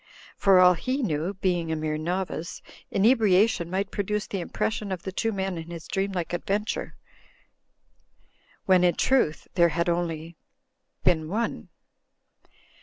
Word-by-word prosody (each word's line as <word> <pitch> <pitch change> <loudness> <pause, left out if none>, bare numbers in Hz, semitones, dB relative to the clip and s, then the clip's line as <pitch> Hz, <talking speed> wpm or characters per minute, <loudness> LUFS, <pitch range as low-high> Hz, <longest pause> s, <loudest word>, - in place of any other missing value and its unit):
For 195 -2 +5
all 180 0 +7
he 255 - -2
knew 170 0 -1
(being 175 -3 -1
a - - 0
mere 155 0 -2
novice) 170 +1 -3 0.3
inebriation 210 -3 +3
might 195 +2 -2
produce 210 +1 -2
the 195 - -4
impression 205 +3 -2
of 180 -2 -4
the 190 - -4
two 225 +4 -1
men 190 -3 -3
of 160 - -7
his 165 -1 -9
dream 195 0 -1
r - - -7
like 175 -1 -3
adventure, 200 +4 -2 1.7
when 185 -1 +5
in 175 -1 +3
truth 250 -13 +1
there 170 -1 +4
had 170 +2 0
only 165 -1 -2 0.7
been 160 -2 +2
one. 210 - -3
180 Hz, 145 wpm, -26 LUFS, 170-200 Hz, 1.7 s, all